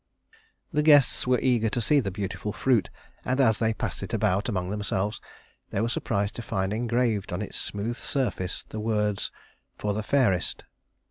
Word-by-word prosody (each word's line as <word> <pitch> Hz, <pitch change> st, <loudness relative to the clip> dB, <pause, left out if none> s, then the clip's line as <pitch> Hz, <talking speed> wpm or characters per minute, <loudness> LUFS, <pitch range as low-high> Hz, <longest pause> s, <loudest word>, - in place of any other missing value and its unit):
The 150 Hz, -, +3 dB
guests 145 Hz, -6 st, +5 dB
were 125 Hz, 0 st, +4 dB
eager 120 Hz, -4 st, +3 dB
to 120 Hz, -, 0 dB
see 145 Hz, +6 st, +4 dB
the 105 Hz, -7 st, -1 dB
beautiful 100 Hz, +1 st, -4 dB
fruit, 120 Hz, -1 st, +2 dB, 0.3 s
and 130 Hz, +2 st, 0 dB
as 110 Hz, -5 st, +4 dB
they 110 Hz, -1 st, +2 dB
passed 110 Hz, -, -3 dB
it 115 Hz, -, -3 dB
about 105 Hz, 0 st, +1 dB
among 90 Hz, -4 st, -2 dB
themselves 105 Hz, 0 st, -2 dB, 0.5 s
they -, -, -2 dB
were 115 Hz, -, +1 dB
surprised 105 Hz, -3 st, -1 dB
to -, -, -3 dB
find 95 Hz, -4 st, -1 dB
engraved 115 Hz, -3 st, 0 dB
on 90 Hz, +4 st, -2 dB
its -, -, -5 dB
smooth 110 Hz, +4 st, -2 dB
surface 105 Hz, -9 st, -2 dB
the 110 Hz, -, -5 dB
words 105 Hz, -2 st, 0 dB, 0.5 s
"For 105 Hz, -1 st, -1 dB
the 110 Hz, -, -2 dB
Fairest." 105 Hz, -6 st, +1 dB
110 Hz, 175 wpm, -27 LUFS, 100-120 Hz, 0.5 s, guests